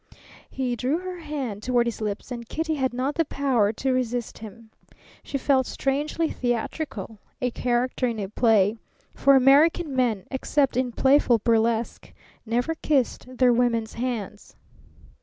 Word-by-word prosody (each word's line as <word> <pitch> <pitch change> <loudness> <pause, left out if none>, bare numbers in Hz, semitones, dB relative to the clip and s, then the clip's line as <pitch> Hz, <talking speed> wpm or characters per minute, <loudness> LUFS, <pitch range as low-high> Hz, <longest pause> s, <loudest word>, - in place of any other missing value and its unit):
He 255 -2 -2
drew 255 +7 0
her 365 0 -6
hand 275 -10 -5
toward 245 0 +1
his 235 -1 -4
lips, 210 +3 -4
and 235 -2 -6
Kitty 320 0 -2
had 265 -3 0
not 255 +4 -2
the 330 - +1
power 260 -8 +1
to 260 +3 -1
resist 245 -2 -2
him. 220 +1 -12 0.5
She 275 - -4
felt 265 -1 +2
strangely 295 +4 -1
theatrical, 235 -3 -3 0.2
a 250 -1 -1
character 250 +1 0
in 230 -2 -3
a 200 -2 -3
play; 215 0 +2 0.4
for 275 0 +4
American 285 +3 +4
men, 230 -7 0
except 275 0 0
in 250 -1 0
playful 265 -1 +4
burlesque, 225 0 0 0.3
never 245 +8 0
kissed 260 -4 -1
their 250 -1 +5
women's 230 -2 0
hands. 230 -4 -5
250 Hz, 145 wpm, -25 LUFS, 230-275 Hz, 0.5 s, their